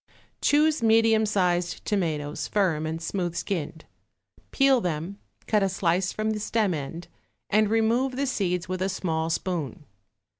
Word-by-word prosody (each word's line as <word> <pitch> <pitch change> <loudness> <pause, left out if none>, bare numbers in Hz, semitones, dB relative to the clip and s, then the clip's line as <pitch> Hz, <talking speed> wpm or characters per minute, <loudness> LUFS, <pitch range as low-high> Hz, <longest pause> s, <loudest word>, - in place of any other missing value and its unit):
Choose 300 0 +3
medium 225 -1 +4
sized 180 -4 0
tomatoes, 155 -8 -1
firm 170 -7 +1
and 160 +1 -3
smooth 175 0 -3
skinned. 170 -3 -4 0.6
Peel 275 -3 +3
them, 175 +3 -3 0.3
cut 210 -2 +2
a 195 - +2
slice 185 0 0
from 215 0 -1
the 215 - -2
stem 210 -2 0
end 160 +3 -6 0.4
and 215 0 +3
remove 230 +4 +1
the 280 +2 0
seeds 185 -8 -1
with 185 0 -3
a 190 - +1
small 165 -4 -2
spoon. 160 - -3
190 Hz, 145 wpm, -26 LUFS, 170-220 Hz, 0.6 s, medium